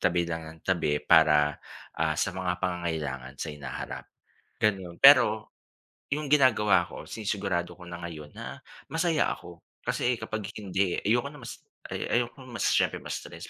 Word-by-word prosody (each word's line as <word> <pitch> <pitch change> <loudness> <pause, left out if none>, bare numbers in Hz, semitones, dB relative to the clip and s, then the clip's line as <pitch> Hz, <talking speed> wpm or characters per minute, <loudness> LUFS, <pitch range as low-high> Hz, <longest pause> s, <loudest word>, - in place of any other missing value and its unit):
tabi 85 -1 +2
lang 80 -1 -4
nang 80 0 -11
tabi 75 0 0
para, 75 -2 +5 0.4
ah, - - +1
sa - - 0
mga 90 -1 -3
pangangailangan 80 -7 -3
sa 80 - -5
hinaharap, 75 -2 -6 0.5
ganon. 95 -5 0
Pero, - - +6 0.6
yung 150 0 -3
ginagawa 130 -7 +4
ko - - -10
sinisigurado 95 -5 -2
ko 90 - -11
na 85 - -6
ngayon 75 -3 -8
na, - - -7 0.3
masaya 165 -1 +2
ako. 85 -1 -12 0.2
Kasi 125 - +1
kapag 110 -2 -4
hindi, 95 -2 0
ayoko 120 +6 +2
na 150 - -12
mas - - -9 0.3
ayoko 120 +3 -1
mas 120 -1 -4
siyempre - - +2
ma-stress - - -7
90 Hz, 145 wpm, -28 LUFS, 80-110 Hz, 0.6 s, Pero